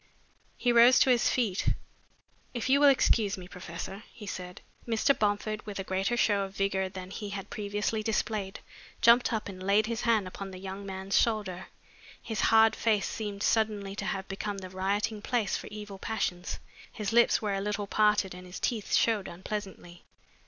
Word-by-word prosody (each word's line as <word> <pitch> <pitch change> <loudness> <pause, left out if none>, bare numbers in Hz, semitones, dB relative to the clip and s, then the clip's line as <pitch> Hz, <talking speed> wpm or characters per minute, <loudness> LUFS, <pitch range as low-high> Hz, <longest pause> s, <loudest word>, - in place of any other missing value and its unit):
He 245 - +2
rose 240 +2 +7
to 260 - +5
his 240 -1 +3
feet. 215 -7 0 0.8
"If 240 +2 -2
you 275 +1 +5
will 290 0 +7
excuse 220 -7 +3
me, 180 -1 -9
professor," 180 +2 -7
he 215 - -11
said. 180 -2 -7 0.3
Mr. 230 +4 +3
Bomford, 210 +1 -1
with 205 - -5
a 195 - -3
greater 190 +5 -1
show 205 -3 +3
of 195 0 -5
vigor 190 -1 0
than 185 -1 -8
he 205 0 -5
had 195 -1 -6
previously 210 +1 -2
displayed, 215 -2 -2 0.4
jumped 235 +1 +6
up 220 -2 -2
and 185 -2 -8
laid 200 +3 +3
his 230 0 -3
hand 220 -5 +2
upon 195 +1 -7
the 185 - -9
young 195 +1 -7
man's 190 0 +1
shoulder. 205 -5 -1 0.5
His 220 -3 -3
hard 225 0 +6
face 215 -3 +1
seemed 205 -2 -4
suddenly 210 -3 +1
to - - -3
have 195 0 -3
become 200 +1 -4
the 185 -1 -8
rioting 205 +3 -1
place 225 -4 0
for - - -5
evil 210 -2 -8
passions. 185 -5 -2 0.3
His 210 -1 -4
lips 235 0 +5
were 210 -2 -2
a 195 - -1
little 210 0 -2
parted 210 -2 +2
and 180 0 -10
his 180 - -8
teeth 225 -5 -1
showed 220 -4 +2
unpleasantly. 180 -1 -7
205 Hz, 180 wpm, -29 LUFS, 190-220 Hz, 0.8 s, rose